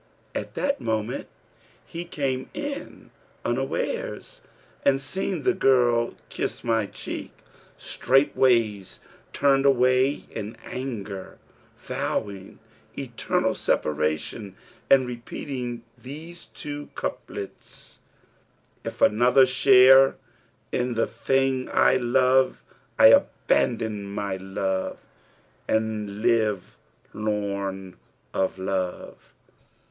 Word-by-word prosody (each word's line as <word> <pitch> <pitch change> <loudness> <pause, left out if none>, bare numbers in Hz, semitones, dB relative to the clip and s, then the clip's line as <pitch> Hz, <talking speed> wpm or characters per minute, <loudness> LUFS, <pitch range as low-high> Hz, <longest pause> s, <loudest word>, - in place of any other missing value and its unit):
[FN#334] - - -1
At - - -13
that 280 0 -1
moment 110 +1 -2 0.6
he 170 +1 -6
came 135 -6 -2
in 290 -1 -6 0.3
unawares, - - -3 0.4
and, 135 -1 +3
seeing 180 +2 -2
the 190 - +3
girl 120 -8 +3
kiss - - -3
my 115 -3 +1
cheek, - - -6 0.5
straightways 115 -7 +2 0.3
turned 135 -1 +3
away 130 0 +3
in 110 +1 -6
anger, 105 -7 -6 0.4
vowing 100 -1 -4 0.4
eternal - - -1
separation 75 +7 -1 0.3
and 135 -1 +6
repeating 120 0 -5
these 160 +6 -10
two 145 0 -6
couplets, 100 - -7 0.8
'If - - -3
another 125 +4 +5
share 130 +1 +7 0.6
in 125 -1 -1
the 115 - +2
thing 135 +2 0
I 130 - +4
love, 130 +1 +2 0.2
* - - -37
I - - +7
abandon 110 -4 +2
my 100 -1 -3
love 95 0 -2 0.7
and 110 -1 -1
live 110 -5 +1 0.4
lorn 100 -3 -3 0.4
of 95 0 0
love. 95 -1 -4
120 Hz, 90 wpm, -25 LUFS, 105-135 Hz, 0.8 s, share